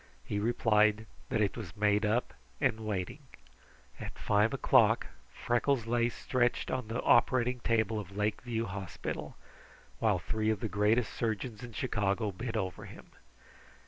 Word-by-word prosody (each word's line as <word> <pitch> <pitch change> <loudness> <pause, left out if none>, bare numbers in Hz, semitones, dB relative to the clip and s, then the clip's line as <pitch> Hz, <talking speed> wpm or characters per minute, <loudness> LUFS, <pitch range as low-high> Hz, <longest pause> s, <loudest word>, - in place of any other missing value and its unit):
He 100 - -2
replied 110 -1 +3 0.2
that 110 - +1
it 100 - +1
was 105 -7 -8
made 105 +1 +3
up 115 +4 0 0.3
and 130 -6 +1
waiting. 105 -5 -3 0.8
At - - -7
five 105 +2 +2
o'clock - - +4 0.3
Freckles 120 0 0
lay 120 0 +2
stretched 120 0 0
on 125 -4 -2
the 115 +2 -3
operating 125 +1 +3
table 110 -2 +1
of 100 -1 -8
Lake 105 0 0
View 115 -2 -2
Hospital, 95 -5 -5 0.6
while - - +3
three 110 0 -1
of 110 -2 +1
the 110 - -2
greatest 105 +4 +2
surgeons 110 +1 -3
in 120 -2 -8
Chicago 105 -3 0
bent 110 +4 -4
over 95 -4 -3
him. - - -13
110 Hz, 145 wpm, -31 LUFS, 105-120 Hz, 0.8 s, o'clock